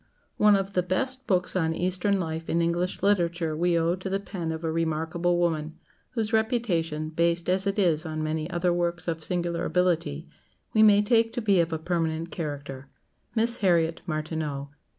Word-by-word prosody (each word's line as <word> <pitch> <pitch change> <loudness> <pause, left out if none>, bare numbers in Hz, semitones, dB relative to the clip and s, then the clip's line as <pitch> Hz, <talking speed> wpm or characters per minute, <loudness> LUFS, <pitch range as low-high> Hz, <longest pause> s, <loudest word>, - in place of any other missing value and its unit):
One 210 -1 +6
of 195 0 -2
the 180 - +2
best 255 +9 -2
books 180 -3 +1
on 160 -3 +1
Eastern 185 +3 0
life 160 -2 -4
in 170 - +1
English 170 +2 -1
literature 170 -5 +1
we 170 +1 +2
owe 165 +1 +2
to 185 +1 -6
the 195 +1 0
pen 180 -5 -4
of 160 +1 -5
a 160 - -1
remarkable 165 +2 0
woman, 160 -2 -1 0.4
whose 225 -2 -2
reputation, 180 - 0
based 170 +1 0
as 190 +2 +2
it 200 - -1
is 170 -6 +2
on 155 -2 -4
many 155 +1 -2
other 175 -1 +1
works 175 0 -1
of 165 -1 -2
singular 175 0 -2
ability, 170 - 0 0.5
we 215 - +4
may 210 -1 +6
take 225 +1 +3
to 245 - -2
be 200 -4 +4
of 165 -1 +1
a 160 - -1
permanent 165 0 -2
character 140 -4 -6 0.5
Miss 235 +2 +2
Harriet 170 -5 +2
Martineau. 155 -3 -3
170 Hz, 180 wpm, -26 LUFS, 160-190 Hz, 0.5 s, One